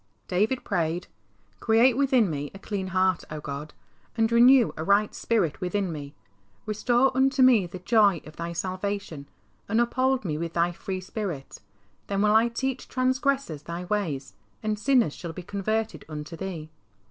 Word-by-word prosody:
D 180 +1 0
avid 250 +4 -1
prayed, 170 +1 -1 0.5
''Create 230 +2 +4
within 260 -5 +3
me 145 -3 -3
a - - -6
clean 200 -1 -4
heart, 185 -1 +1
O 155 - -5
God, 150 +1 -6 0.5
and 225 0 +2
renew 245 +1 +6
a 160 - -4
right 200 +4 +3
spirit 195 -8 0
within 185 0 -1
me. 145 -2 -7 0.5
Restore 240 +5 +2
unto 265 0 +3
me 235 -8 +5
the 175 - -8
joy 200 -1 +3
of 155 - -12
Thy 170 0 -4
salvation, 185 -4 -4 0.4
and 220 +3 +2
uphold 255 0 +1
me 155 -3 -2
with 165 0 -4
Thy 170 +1 +2
free 185 +1 -5
Spirit. 185 -8 -5 0.5
Then 200 0 0
will 210 0 +4
I 225 +2 +5
teach 265 +2 -3
trans 255 0 0
gressors 270 - -1
Thy 170 +2 -5
ways, 165 - -2 0.3
and 215 -1 -1
sinners 245 - +3
shall 170 -2 -7
be 180 - -8
converted 215 +4 -2
unto 150 +2 -6
Thee." 165 -4 -6
200 Hz, 170 wpm, -26 LUFS, 170-235 Hz, 0.5 s, renew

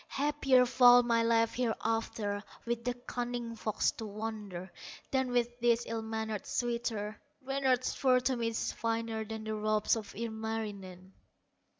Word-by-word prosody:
Happier 275 -3 +3
far 245 0 +7
my 230 -1 +2
life 230 0 +3
hereafter, 225 -3 -1 0.2
With 235 0 -2
the 245 0 -1
cunning 245 -1 -4
fox 215 -1 0
to 225 - -7
wander, 205 -4 -6 0.4
Than 265 -1 +1
with 240 0 0
this 235 0 +3
ill 225 0 -3
mannered 220 -2 -4
suitor; 235 -3 -2 0.2
Reynard's 265 -2 +1
fur 255 -2 +3
to 260 +1 +1
me 235 -1 -1
is 230 0 -1
finer 225 -1 -2
Than 220 0 -6
the 220 0 -3
robes 215 0 +2
of 215 -3 -7
Ilmarinen." 215 -4 -5
230 Hz, 140 wpm, -32 LUFS, 220-245 Hz, 0.4 s, far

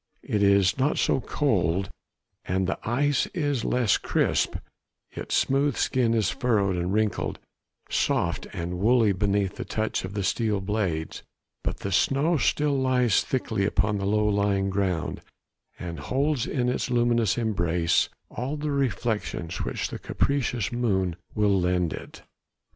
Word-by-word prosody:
It 105 - -1
is 100 +2 +4
not 140 +3 +2
so - - +2
cold, 95 - 0 0.5
and 95 +1 0
the 95 - -2
ice 140 +3 +2
is 145 -8 0
less 120 -5 +2
crisp, - - +1 0.6
its - - -4
smooth 140 0 +2
skin 120 -3 +1
is 105 -4 +1
furrowed 100 -6 +1
and 90 +1 -1
wrinkled, 105 0 0 0.5
soft - - 0
and 90 +1 -4
woolly 115 +1 +4
beneath 100 0 0
the - - -3
touch 110 0 -2
of 95 +2 -6
the 100 - -1
steel 105 +2 0
blades; 95 -5 -2 0.4
but - - -3
the 100 - -3
snow 140 - +2
still 145 0 +1
lies 125 -3 +3
thickly 125 -6 -1
upon 105 +1 +1
the 100 - -2
low 105 +1 +2
lying 100 -1 +1
ground, 95 -4 -1 0.6
and 85 -3 -6
holds 135 - 0
in 125 -3 0
its 125 - -1
luminous 120 -3 +2
embrace 85 -7 +1 0.2
all 135 +5 -3
the 150 0 -2
reflections 110 -9 -2
which - - -2
the - - -6
capricious 125 -6 -1
moon 95 -8 0 0.2
will 100 -3 +3
lend 90 -2 +1
it. - - -10
105 Hz, 145 wpm, -26 LUFS, 95-125 Hz, 0.6 s, is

